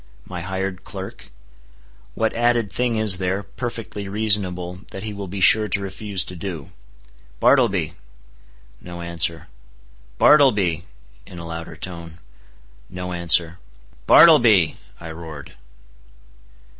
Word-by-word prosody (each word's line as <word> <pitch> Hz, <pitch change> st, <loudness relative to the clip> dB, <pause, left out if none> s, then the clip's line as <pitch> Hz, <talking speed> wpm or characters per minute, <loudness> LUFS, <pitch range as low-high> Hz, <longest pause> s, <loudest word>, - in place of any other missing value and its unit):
—my 90 Hz, -2 st, -7 dB
hired 95 Hz, +1 st, -4 dB
clerk? 95 Hz, -, -9 dB, 0.9 s
What 110 Hz, -1 st, 0 dB
added 120 Hz, -3 st, +1 dB
thing 125 Hz, -2 st, 0 dB
is 110 Hz, -4 st, +1 dB
there, 95 Hz, +2 st, -1 dB
perfectly 105 Hz, -1 st, -6 dB
reasonable, 95 Hz, -4 st, +1 dB
that 95 Hz, -, -8 dB
he 110 Hz, -1 st, -5 dB
will 100 Hz, -1 st, -7 dB
be 95 Hz, +2 st, -6 dB
sure 110 Hz, +3 st, +6 dB
to 105 Hz, -, 0 dB
refuse 100 Hz, 0 st, -2 dB
to 90 Hz, -, -7 dB
do? 85 Hz, -5 st, -7 dB, 0.7 s
"Bartleby!" 100 Hz, -, +3 dB, 0.9 s
No 85 Hz, -1 st, -9 dB
answer. 85 Hz, -1 st, -1 dB, 0.7 s
"Bartleby," 105 Hz, -, +4 dB, 0.4 s
in 90 Hz, -, -11 dB
a 85 Hz, -, -7 dB
louder 85 Hz, 0 st, -7 dB
tone. 85 Hz, 0 st, -7 dB, 0.7 s
No 90 Hz, 0 st, -6 dB
answer. 85 Hz, 0 st, +2 dB, 0.5 s
"Bartleby," 115 Hz, -, +6 dB, 0.2 s
I 80 Hz, -1 st, -8 dB
roared. 80 Hz, -3 st, -10 dB
95 Hz, 115 wpm, -21 LUFS, 85-105 Hz, 0.9 s, sure